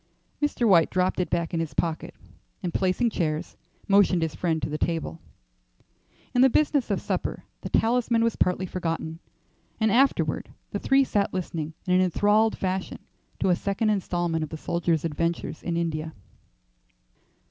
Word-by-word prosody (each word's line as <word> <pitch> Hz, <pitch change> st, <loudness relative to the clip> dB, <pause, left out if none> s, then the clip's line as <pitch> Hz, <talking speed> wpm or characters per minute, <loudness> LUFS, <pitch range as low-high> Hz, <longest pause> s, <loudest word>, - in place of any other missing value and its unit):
Mr. 290 Hz, -5 st, +1 dB
White 170 Hz, -5 st, +5 dB
dropped 185 Hz, +1 st, 0 dB
it 180 Hz, -, 0 dB
back 170 Hz, -1 st, -1 dB
in 165 Hz, -, 0 dB
his 160 Hz, -4 st, -3 dB
pocket, 165 Hz, -2 st, -2 dB, 0.5 s
and 175 Hz, -, -2 dB
placing 190 Hz, +6 st, +1 dB
chairs, 160 Hz, -2 st, -2 dB, 0.3 s
motioned 195 Hz, -4 st, +4 dB
his 160 Hz, -2 st, -2 dB
friend 165 Hz, 0 st, 0 dB
to -, -, -2 dB
the 150 Hz, 0 st, -4 dB
table. 165 Hz, -1 st, -2 dB, 1.1 s
In 245 Hz, -, +4 dB
the 265 Hz, -, +7 dB
business 285 Hz, -2 st, +2 dB
of 200 Hz, -, +1 dB
supper -, -, -3 dB, 0.2 s
the -, -, -5 dB
talisman 235 Hz, 0 st, +2 dB
was 230 Hz, -1 st, +1 dB
partly 180 Hz, +1 st, +1 dB
forgotten, 165 Hz, -3 st, -3 dB, 0.6 s
and 220 Hz, -1 st, +3 dB
afterward 270 Hz, +5 st, +2 dB, 0.2 s
the -, -, -2 dB
three 270 Hz, 0 st, +4 dB
sat 205 Hz, -7 st, 0 dB
listening 160 Hz, -4 st, -4 dB
in 180 Hz, -, +1 dB
an 185 Hz, -, +5 dB
enthralled 205 Hz, +4 st, +3 dB
fashion 190 Hz, 0 st, -2 dB, 0.4 s
to -, -, +2 dB
a 180 Hz, -, +4 dB
second 200 Hz, +4 st, 0 dB
instalment 175 Hz, -5 st, -1 dB
of 155 Hz, -, -5 dB
the 160 Hz, -, -6 dB
soldier's 170 Hz, -1 st, 0 dB
adventures 165 Hz, +1 st, -2 dB
in 170 Hz, -1 st, -2 dB
India. 160 Hz, -2 st, -2 dB
180 Hz, 160 wpm, -26 LUFS, 165-205 Hz, 1.1 s, the